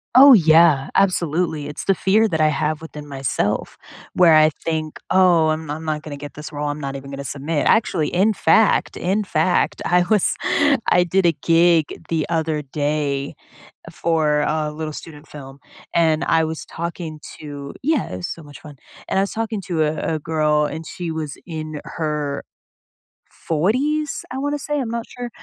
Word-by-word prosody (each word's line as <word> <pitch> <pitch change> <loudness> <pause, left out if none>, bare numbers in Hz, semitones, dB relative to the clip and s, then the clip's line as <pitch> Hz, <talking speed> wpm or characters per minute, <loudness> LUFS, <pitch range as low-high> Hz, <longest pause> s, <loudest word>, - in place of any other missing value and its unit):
Oh, 275 +2 +10
yeah, 160 - +5
absolutely, 170 -5 +1
it's 150 - -7
the 195 - +4
fear 205 +4 +2
that 160 -6 -1
I 155 - +5
have 150 +1 -1
within 150 -2 -9
myself 135 -7 -2 0.4
where 175 -3 +5
I 155 0 +6
think, 155 -2 -3
"Oh, 175 -4 +4
I'm 155 0 -3
I'm 155 +2 -5
not 155 -1 -2
gonna 150 -2 -8
get 145 +1 -9
this 150 +1 -9
role, 145 -1 -3
I'm 145 +1 -4
not 140 -1 -5
even 140 0 -8
gonna 140 0 -6
submit," 145 +3 -2
actually, 185 -8 +2
in 200 +5 +2
fact 210 +4 +3
in 195 +4 0
fact, 175 -1 0
I 180 0 +3
was 210 -4 +3 0.6
I 175 0 +4
did 185 +2 +1
a 170 - +4
gig 165 -1 +4 0.2
the 160 -2 0
other 160 -2 -1
day 145 -1 -2 0.6
for 155 -3 +1
a 150 0 -1
little 155 0 -5
student 150 -2 -10
film, 140 -1 -11 0.3
and 160 -2 +2
I 165 -1 +2
was 160 0 -5
talking 170 -2 -6 0.2
to 145 -2 -8
yeah, 305 0 0
it - - -4
was 90 - -4
so 165 - -13
much 145 -1 -13
fun 150 -2 -12 0.3
and - - 0
I - - +4
was 200 - -4
talking 225 -2 -3
to 165 -4 +1
a 155 0 -1 0.2
a - - -3
girl, 150 -1 +1
and 160 +2 -5
she 175 -2 -5
was 155 -3 -5
in 155 -3 -6
her 150 -3 -3 0.9
40s? 265 - -1
I 260 - -4
wanna 290 +2 -2
say, 295 +1 -2
I'm 250 -4 -3
not 235 0 -3
sure, 245 -1 -7
160 Hz, 180 wpm, -21 LUFS, 150-180 Hz, 0.9 s, Oh